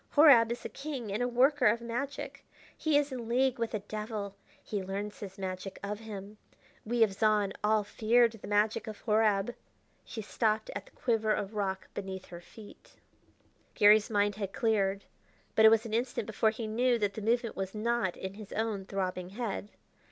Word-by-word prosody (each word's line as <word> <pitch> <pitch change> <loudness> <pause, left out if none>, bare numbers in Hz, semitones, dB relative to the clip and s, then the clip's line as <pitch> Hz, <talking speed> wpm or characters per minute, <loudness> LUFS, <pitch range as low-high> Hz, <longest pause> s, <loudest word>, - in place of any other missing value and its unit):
Horab 275 -7 +7
is 240 - -5
a - - -3
king 275 -7 -5
and 215 - -1
a 245 - +2
worker 255 +2 +4
of 220 +3 +3
magic; 240 +4 -5 0.3
he 310 -2 +2
is 290 -1 +1
in 240 -3 -5
league 255 +1 +2
with 230 -1 -1
a 210 - -2
devil; 210 -1 -5 0.3
he 205 -2 -3
learns 200 +2 -5
his 195 -2 -8
magic 190 0 -5
of 205 +1 -3
him. 210 -1 -8 0.4
We 235 +1 +3
of 205 -3 +1
Zahn, 210 -1 +2
all 215 0 +3
feared 230 +3 +3
the 220 -3 -11
magic 210 +2 +1
of 215 -1 -7
Horab 215 0 +2 0.3
" - - -40
She 220 - -7
stopped 215 0 0
at - - -6
the - - -18
quiver 225 -3 0
of 205 0 -1
rock 195 -2 -2
beneath 190 -2 -6
their 175 0 -8
feet. 210 +4 -15 0.8
Garry's 210 -1 +6
mind 205 -1 +1
had 200 -2 -4
cleared, 200 -3 +1 0.5
but 220 - +5
it - - +11
was 225 +1 +3
an 220 - -6
instant 240 -1 -1
before 220 +1 +2
he 220 +1 -4
knew 240 +3 +2
that 205 -3 0
the 220 - -6
movement 230 +2 0
was 190 +1 -4
not 215 -4 0
in 190 0 -5
his 205 -1 -11
own 215 -3 -2
throbbing 185 -2 -3
head. 205 -1 -4
215 Hz, 190 wpm, -31 LUFS, 200-235 Hz, 0.8 s, it